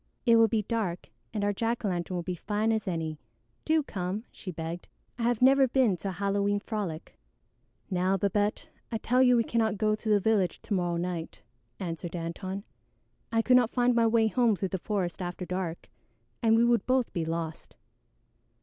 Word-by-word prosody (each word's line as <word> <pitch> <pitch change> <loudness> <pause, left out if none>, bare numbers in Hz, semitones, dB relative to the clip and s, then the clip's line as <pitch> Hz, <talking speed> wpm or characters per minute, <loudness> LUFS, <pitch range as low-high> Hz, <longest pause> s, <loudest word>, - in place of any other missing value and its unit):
It 230 -2 +6
will 225 0 +6
be 220 0 0
dark 205 -5 -3 0.2
and 210 -2 -2
our 205 0 +1
jack 230 +2 -1
o' - - +2
lantern 180 -1 -2
will 175 - -2
be 180 - -3
as 175 - -5
fine 215 +1 0
as 220 -2 -1
any. 160 -4 -3 0.5
Do 315 -1 +3
come," 195 -2 -4
she 190 - -9
begged, 165 0 -5 0.3
"I - - -3
have 240 0 +1
never 270 +1 +6
been 245 -6 +3
to 195 - -4
a - - -4
Halloween 200 +2 0
frolic." 200 - -5 0.7
"Now, 185 +1 +2
Babette, 205 +2 0 0.2
I 225 - 0
tell 250 +3 +2
you 250 -1 +6
we 230 - +3
cannot 220 -3 0
go 215 +1 +2
to 215 +1 -3
the 210 -1 +5
village 200 -3 +1
to - - -3
morrow 175 -2 0
night," 170 -1 -4 0.4
answered 170 -1 -5
Antone. 185 +4 -4 0.7
"I 225 0 +2
could 250 +1 +6
not 245 -3 +3
find 245 0 +2
my 230 -1 +4
way 225 0 +3
home 230 +1 +3
through 190 0 -2
the 190 - -3
forest 185 -3 -2
after 180 0 -4
dark, 180 -2 -4 0.5
and 225 -1 +4
we 230 +1 +4
would 235 -1 +2
both 255 -1 +1
be 170 -3 -1
lost. 165 0 -4
205 Hz, 195 wpm, -29 LUFS, 180-230 Hz, 0.7 s, It